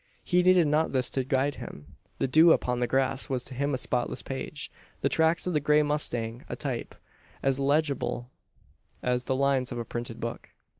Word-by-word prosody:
He 180 0 +3
needed 180 -1 +5
not 150 +1 +1
this 130 -2 +1
to 135 - 0
guide 135 +2 0
him. 75 -9 -10 0.2
The - - 0
dew 160 +5 +7
upon 125 -1 0
the 120 - +1
grass 135 +1 0
was 130 -2 -1
to 130 - -8
him 140 +3 -1
a 130 - 0
spotless 125 -1 -1
page - - -5 0.3
the - - +2
tracks 160 +1 +2
of 180 - -1
the 150 - +3
grey 150 +1 +4
mustang 120 -6 -1
a - - -3
type, - - -4 0.5
as 135 0 +2
legible 140 -3 0 0.7
as 125 0 0
the 130 - 0
lines 135 -1 +1
of 120 - -4
a 120 - -3
printed 120 -1 -5
book. 115 0 -5
135 Hz, 195 wpm, -28 LUFS, 125-150 Hz, 0.7 s, dew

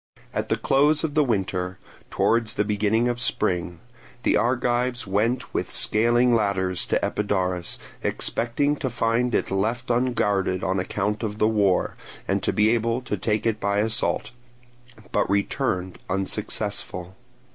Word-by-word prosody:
At - - -2
the - - +3
close 145 +3 +3
of 155 -3 -1
the 150 0 +4
winter, 95 -6 -1 0.3
towards 115 -1 +1
the 105 - +1
beginning 105 +3 +1
of 120 0 -2
spring, 90 -7 0 0.5
the - - +3
Argives 125 +1 +1
went 110 +6 0
with - - -2
scaling 120 +3 +3
ladders 95 -4 0
to - - +1
Epidaurus, 95 -4 -1 0.2
expecting 140 +5 0
to 130 - -2
find 120 +1 +1
it - - 0
left 115 +6 -1
unguarded 105 -7 +1
on 95 +3 0
account 105 +3 -2
of 105 -2 -3
the 110 - +3
war 100 -4 +2 0.3
and - - +1
to - - +1
be 105 +1 +3
able 115 +1 +1
to 120 -4 -3
take 105 +3 -1
it 110 -2 +1
by 100 0 0
assault, 110 +1 +1 0.8
but - - +1
returned 95 -2 -1
unsuccessful. 95 -1 -3
110 Hz, 145 wpm, -24 LUFS, 95-120 Hz, 0.8 s, the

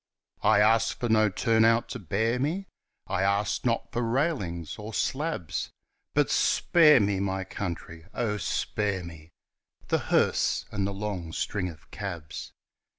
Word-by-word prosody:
I 105 -1 +5
ask 115 +1 +3
for 120 - -2
no 110 -1 +4
"turn 110 +3 +2
out" 115 +1 +4
to - - -5
bear 110 +7 0
me; 165 +9 -1 0.4
I 90 - -1
ask 100 +2 +1
not 115 -1 -1
for 120 - -1
railings 115 - -1
or 105 +1 -7
slabs, 140 - -2 0.5
And - - +4
spare 155 -5 +5
me, 100 -2 +1
my 95 -1 -1
country, 85 -3 -6
oh, 110 -3 -1
spare 100 -2 -1
me 80 -2 -11 0.6
The - - +2
hearse - - +2
and 100 -2 -1
the - - -3
long 95 -5 -4
string 95 -4 -2
of 80 -2 -14
cabs! 85 -7 -6
105 Hz, 150 wpm, -27 LUFS, 90-115 Hz, 0.6 s, I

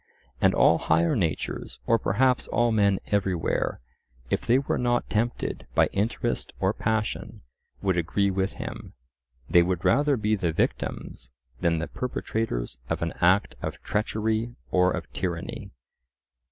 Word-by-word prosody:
And - - +4
all - - +5
higher 80 +1 +2
natures, 80 -7 -2
or 115 0 +3
perhaps 125 +6 +2
all 120 0 +2
men 100 -3 +3
everywhere, 95 -10 0 0.5
if - - +1
they 120 - +5
were 135 - -1
not 120 0 +1
tempted 110 - -1
by - - +4
interest 105 +4 -1
or - - +2
passion, 110 -1 -2 0.4
would 95 -2 +2
agree 100 +4 +1
with 95 +1 -1
him—they 65 +4 -3
would 90 +1 -1
rather 145 +8 +4
be 110 0 +1
the 85 -5 -1
victims - - -2 0.3
than 85 -1 +2
the 80 - -2
perpetrators 110 - -3
of - - -1
an 85 - -2
act 90 +3 +4
of - - -4
treachery 110 +2 -1 0.2
or 90 0 +4
of - - -3
tyranny. 85 -3 -4
95 Hz, 140 wpm, -26 LUFS, 85-110 Hz, 0.5 s, all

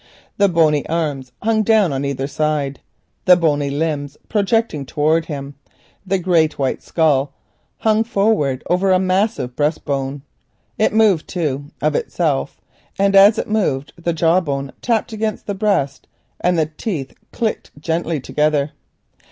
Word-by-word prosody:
The 200 -1 +4
bony 155 -4 +3
arms 145 -6 -2
hung 220 0 +2
down 215 -7 +3
on 135 +1 -2
either 135 -1 -2
side, 145 -1 -1 0.5
the 180 - +8
bony 145 -4 +1
limbs 145 -1 -2
projected 210 - 0
towards 155 +2 +1
him, 140 -2 -6 0.5
the 195 +1 +2
great 170 -4 +2
white 135 -2 -1
skull 145 -4 +1 0.4
hung 220 0 +2
forward 195 - +1
over 180 +2 +2
the 185 - +5
massive 185 - 0
breast 150 +1 -1
bone. 135 -1 -3 0.6
It 215 - +3
moved, 215 -7 +3
too, 145 -6 -2 0.2
of - - +2
itself, 485 -1 -1 0.4
and 200 0 +2
as 200 +3 +7
it - - -2
moved, 160 -11 -1
the 170 0 -2
jaw 165 +2 +3
bone 140 -5 -3
tapped 230 -1 0
against 215 -1 -3
the 205 - -2
breast 190 -10 -1 0.3
and 180 -1 +1
the 160 - +3
teeth 155 - -4 0.2
clacked 225 -3 -2
gently 165 0 -1
together. 150 +1 0
165 Hz, 145 wpm, -19 LUFS, 145-200 Hz, 0.6 s, the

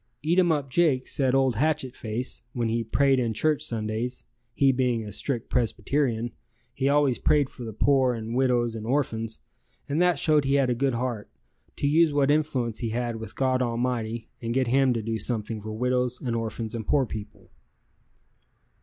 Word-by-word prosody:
Eatumup 165 -4 +2
Jake 135 -2 +2
said 130 -2 +1
old 130 -4 +2
Hatchet 145 -2 0
Face, 115 +3 -4
when 120 -2 -1
he 115 +1 0
prayed 135 +4 +2
in 115 -3 -1
church 155 +5 +1
Sundays 115 +2 -3 0.3
(he 135 -1 +4
being 125 -3 0
a 105 - -7
strict 120 +3 -3
Presbyterian), 120 +1 0 0.4
he 135 - 0
always 140 -3 +3
prayed 145 -3 +2
for 125 - -9
the 110 - -5
poor 130 +2 +2
and 115 0 -5
widows 120 -2 +1
and 110 0 -6
orphans, 115 -4 -1 0.5
and 150 +4 0
that 180 -3 +3
showed 150 0 +3
he 135 +1 +1
had 135 -3 +3
a - - +3
good 130 +1 0
heart, 120 -3 -3 0.5
to 140 - -1
use 160 +1 +4
what 145 -1 +3
influence 135 -7 0
he 115 - -2
had 120 0 -2
with 110 0 -8
God 130 -1 +1
Almighty 115 -2 -2
and 115 0 -3
get 130 -1 +2
Him 130 +2 +3
to 115 -2 -3
do 115 0 -2
something 110 0 -2
for 110 +1 -6
widows 125 +2 0
and 120 -3 -2
orphans 115 0 -3
and 115 -3 -5
poor 140 -3 +3
people. 105 -2 -9
125 Hz, 180 wpm, -26 LUFS, 115-135 Hz, 0.5 s, he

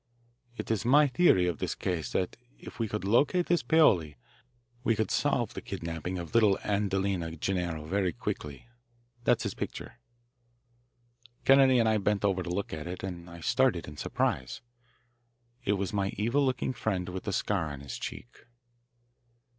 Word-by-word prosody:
"It - - -4
is 110 -2 0
my 145 +5 +6
theory 130 - +4
of 85 -3 -2
this - - -2
case 85 -4 -3
that 90 -1 -1 0.2
if - - -11
we 115 - 0
could 105 -1 -4
locate 145 - +3
this 175 -1 +2
Paoli 90 - +3 0.7
we 115 -3 +2
could 110 0 -1
solve 125 -6 +1
the - - -6
kidnapping 85 -1 -4
of 85 -3 -7
little 105 -4 +5
Adelina 95 -4 -1
Gennaro 85 -2 -2
very 95 +2 0
quickly. 70 - -5 0.6
That's - - +3
his - - -2
picture." 120 - -6 1.5
Kennedy 135 -1 +6
and 115 -2 +3
I 110 -1 +3
bent 105 0 0
over 95 -2 +1
to 90 - -5
look 95 +1 -3
at 80 +1 -5
it, 90 +1 -6
and 90 -2 -6
I 85 0 -10
started 120 -4 +2
in 75 - -9
surprise. 65 -3 -2 1.0
It 100 - +3
was 100 +1 -2
my 100 -1 +1
evil 120 +8 +2
looking 130 -1 0
friend 100 -6 -2
with 90 +1 -6
the 105 - -1
scar 90 -5 -1
on 70 -1 -8
his 70 -3 -7
cheek. - - -8
95 Hz, 165 wpm, -29 LUFS, 85-115 Hz, 1.5 s, my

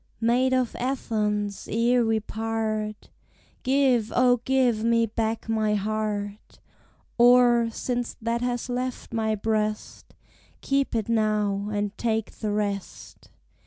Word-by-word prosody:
Maid 245 +3 +2
of 255 -2 0
Athens, 210 -5 -2
ere 235 +2 +3
we 225 -1 +1
part, 215 -1 -3 0.5
Give, 260 -4 +2
O, 250 0 +4
give 250 -5 +2
me 230 0 +3
back 225 +1 -2
my 215 -1 +1
heart! 210 0 -3 0.6
Or, 240 -1 +6
since 245 +1 -3
that 235 +1 -1
has 245 -1 -2
left 250 0 -4
my 220 -1 0
breast, 215 0 -3 0.5
Keep 275 -2 0
it 220 -2 -1
now, 210 -3 0
and 205 0 -2
take 225 -2 -1
the 215 - -5
rest! 205 -2 -4
225 Hz, 120 wpm, -25 LUFS, 215-245 Hz, 0.6 s, Or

